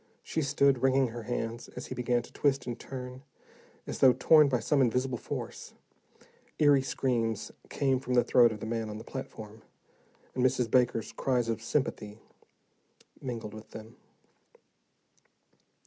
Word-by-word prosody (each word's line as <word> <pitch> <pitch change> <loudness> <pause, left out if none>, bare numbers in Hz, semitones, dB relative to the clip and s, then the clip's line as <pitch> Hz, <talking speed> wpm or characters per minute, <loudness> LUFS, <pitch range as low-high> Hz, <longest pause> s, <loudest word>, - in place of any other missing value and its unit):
She 160 - -2
stood, 140 -2 +2
wringing 135 -1 +3
her 120 +1 -7
hands, 115 0 -4
as - - -6
he - - -6
began 120 -1 0
to - - -15
twist 140 -2 +1
and 120 -1 -5
turn, 125 -1 -8 0.6
as - - -5
though 130 -2 +7
torn 155 0 +5
by 125 -3 +1
some 140 +5 +2
invisible 125 +1 +1
force. - - -6 0.8
Eery 145 -2 +5
screams 115 -5 -1 0.2
came 135 -2 +1
from 125 -1 -2
the 120 - +5
throat 120 -2 +5
of 105 -1 -7
the - - -4
man 115 -1 -3
on 105 - -6
the 110 - -8
platform, 110 -4 -8 0.7
and 125 - -1
Mrs. 125 -3 +1
Baker's 120 -3 +2
cries 125 -3 0
of 115 -1 -2
sympathy 115 -4 -2 1.0
mingled 115 -4 -5
with 110 0 -11
them. 110 +1 -10
125 Hz, 150 wpm, -30 LUFS, 115-135 Hz, 1.0 s, though